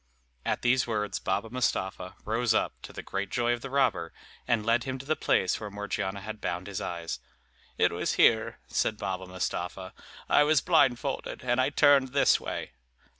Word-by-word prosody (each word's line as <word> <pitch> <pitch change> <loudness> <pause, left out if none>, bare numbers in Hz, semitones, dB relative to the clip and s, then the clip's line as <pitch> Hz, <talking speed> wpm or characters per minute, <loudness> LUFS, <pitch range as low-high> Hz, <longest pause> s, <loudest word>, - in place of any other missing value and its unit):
At - - -1
these 125 +1 +3
words 105 -3 -2
Baba 115 - -2
Mustapha 95 -7 -2
rose 110 +1 +1
up, - - +1
to - - -9
the - - -8
great 100 0 -3
joy 120 0 +1
of 120 - -4
the 135 - -6
robber, 130 -11 +1 0.4
and 115 -3 +1
led 115 +1 +3
him 130 -1 -3
to 135 - -10
the 155 +2 +1
place 95 - +1
where 105 - -6
Morgiana 100 -1 -3
had 110 +1 -7
bound 90 +1 -3
his 100 -2 -5
eyes. 85 -6 -4 0.6
"It - - +3
was - - -1
here," - - +3
said 110 - 0
Baba 95 -1 -4
Mustapha, 90 0 -4 0.3
"I - - +5
was 150 0 +4
blindfolded; 135 -7 +1
and 125 0 +2
I 130 - +2
turned 140 -3 +4
this 140 - +4
way." - - -5
115 Hz, 180 wpm, -28 LUFS, 95-130 Hz, 0.6 s, I